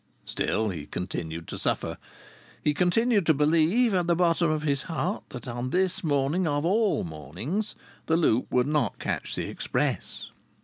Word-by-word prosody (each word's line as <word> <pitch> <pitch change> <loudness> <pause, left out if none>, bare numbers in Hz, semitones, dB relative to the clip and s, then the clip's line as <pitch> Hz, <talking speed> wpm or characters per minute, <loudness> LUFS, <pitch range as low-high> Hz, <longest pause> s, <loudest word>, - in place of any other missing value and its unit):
Still, 110 0 0
he 80 -6 -5
continued 85 -2 -4
to - - -5
suffer. - - -1 0.6
He 150 - +3
continued 205 +6 +3
to 160 - +5
believe, 165 - +3
at 180 -2 +1
the 170 - +3
bottom 170 -1 +3
of 155 -1 0
his 140 -3 +1
heart, 170 +5 -1
that 125 -1 -8
on 120 +1 -3
this 185 +4 0
morning, 150 +4 +1
of 145 +1 0
all 210 +3 +2
mornings, 90 - -4 0.3
the 160 - +3
Loop 130 -8 +2
would 125 -1 +3
not 150 +1 0
catch - - -3
the - - -2
express. - - -2
155 Hz, 165 wpm, -27 LUFS, 125-180 Hz, 0.6 s, to